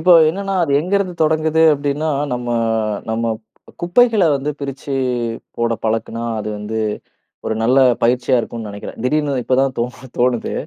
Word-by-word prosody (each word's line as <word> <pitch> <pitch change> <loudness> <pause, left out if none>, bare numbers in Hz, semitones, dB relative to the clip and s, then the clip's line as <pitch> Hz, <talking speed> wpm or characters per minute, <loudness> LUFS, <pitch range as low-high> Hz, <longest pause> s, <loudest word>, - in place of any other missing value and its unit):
இப்போ 180 +2 +5 0.2
என்னன்னா, 195 +2 -3
அது 140 - -2
எங்கே 185 +5 0
இருந்து 185 -3 -2
தொடங்குது 160 +1 +2
அப்பிடின்னா, 145 +2 -1 0.2
நம்ம 120 0 -3 0.6
நம்ம 115 +1 -1
ப் 110 - -36 0.4
குப்பைகளை 220 +2 +4
வந்து 140 +2 -3
பிரிச்சி 140 0 -5 0.6
போட 115 0 0
பழக்குன்னா 115 +1 -1 0.2
அது 105 - -4
வந்து 110 +2 -4 0.7
ஒரு 110 - 0
நல்ல 125 +4 +4 0.2
பயிற்சியா 125 +2 +3
இருக்குன்னு 115 -2 -6
நினைக்கிறேன். 100 0 -8
திடீர்ன்னு 145 +2 +1
இப்பதான் 130 +1 +1
தோணு 125 +2 -4
தோணுது. 120 -1 +1
135 Hz, 145 wpm, -19 LUFS, 115-160 Hz, 0.7 s, இப்போ